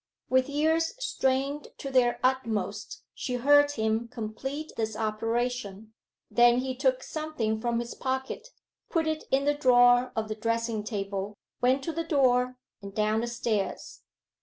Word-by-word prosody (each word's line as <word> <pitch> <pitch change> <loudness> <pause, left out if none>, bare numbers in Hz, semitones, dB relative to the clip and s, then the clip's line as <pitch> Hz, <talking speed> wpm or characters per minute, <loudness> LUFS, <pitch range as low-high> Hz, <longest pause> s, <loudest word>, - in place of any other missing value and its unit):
With 260 +1 +3
ears 320 +6 +1
strained 275 - -1
to 275 - -6
their 245 -2 +3
utmost 220 -6 -1
she 250 - -3
heard 290 +3 +5
him 220 -1 0
complete 255 +6 -5
this 220 -1 -2
operation; 220 -1 -2 0.4
then 240 0 +5
he 260 0 -2
took 260 -1 +1
something 250 -9 -2
from 235 -1 0
his 235 0 -5
pocket, 265 - -3 0.4
put 330 -1 +1
it 315 0 -2
in 275 +1 +2
the 290 - +3
drawer 245 -3 +5
of 220 -1 -1
the 215 - -2
dressing 230 0 -1
table, 200 -1 -4 0.2
went 260 +2 +3
to 330 - -2
the 330 - -2
door, 255 -5 +2 0.2
and 200 0 -9
down 215 +1 +1
the 240 - -2
stairs. 225 -4 -3
245 Hz, 150 wpm, -28 LUFS, 220-270 Hz, 0.4 s, heard